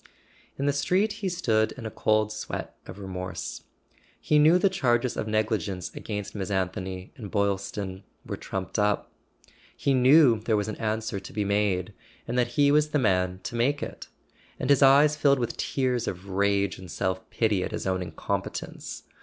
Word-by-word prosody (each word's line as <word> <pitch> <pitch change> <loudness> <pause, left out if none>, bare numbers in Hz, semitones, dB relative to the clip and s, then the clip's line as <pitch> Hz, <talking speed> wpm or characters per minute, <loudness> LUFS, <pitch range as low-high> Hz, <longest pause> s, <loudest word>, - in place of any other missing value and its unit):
In 140 - -2
the 145 - +2
street 185 +9 +2
he 195 - 0
stood 115 -12 +1
in 120 - -9
a 110 - -4
cold 110 0 +1
sweat 110 - -5
of - - -9
remorse. 95 -2 -6 0.5
He 150 - +3
knew 155 +4 +6
the 180 - +3
charges 125 -9 +1
of - - -3
negligence 105 -4 -1
against 105 -2 -5
Miss 100 -2 -4
An¬ 95 -2 0
thony 95 -1 -6
and 105 -6 -7
Boylston 100 -1 -2 0.2
were - - -4
trumped 95 +2 -4
up. 105 0 +1 0.7
He 140 - +1
knew 130 -2 +6
there 110 0 +1
was 105 - -1
an 110 - -3
answer 110 -2 -2
to 95 - -11
be 105 0 -1
made, 100 -3 0 0.3
and 120 - -3
that 125 -1 +3
he 145 -1 +5
was 150 +1 +3
the 150 - +1
man 95 -6 +1
to 115 - -5
make 135 +5 +1
it; - - -7 0.5
and 130 - +1
his 140 - +5
eyes 140 +2 +6
filled 140 -2 +4
with 120 -2 -2
tears 125 -3 -1
of 90 +2 -5
rage 100 0 +1
and 95 -1 -10
self 95 +1 -2
pity 105 -5 +1
at - - -3
his - - -4
own 95 -1 0
incompetence. 90 - -4
110 Hz, 185 wpm, -27 LUFS, 95-135 Hz, 0.7 s, knew